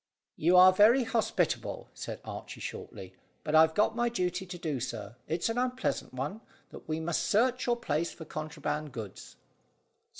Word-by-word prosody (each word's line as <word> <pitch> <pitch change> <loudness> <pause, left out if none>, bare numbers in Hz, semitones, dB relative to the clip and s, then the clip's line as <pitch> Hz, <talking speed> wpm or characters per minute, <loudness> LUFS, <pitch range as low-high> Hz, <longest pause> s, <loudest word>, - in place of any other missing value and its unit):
"You 175 +4 +4
are 185 +1 +9
very 225 +7 +6
hospitable," 225 -2 -1
said - - -7
Archy - - -7
shortly; 95 0 -7 0.3
"but 150 - -3
I've 160 0 +6
got 210 +1 +2
my 240 0 +1
duty 180 -4 -2
to 180 0 -7
do, 155 -6 -2
sir. 105 -1 -5
It's 165 +2 0
an 225 +2 -1
unpleasant 255 0 -1
one, 140 - -4 0.3
that - - -12
we 155 +1 -1
must 160 0 -1
search 250 +4 +2
your 240 0 +2
place 170 -8 -1
for 160 - -10
contraband 155 -2 -4
goods." 105 -5 -8
175 Hz, 165 wpm, -30 LUFS, 155-225 Hz, 0.3 s, are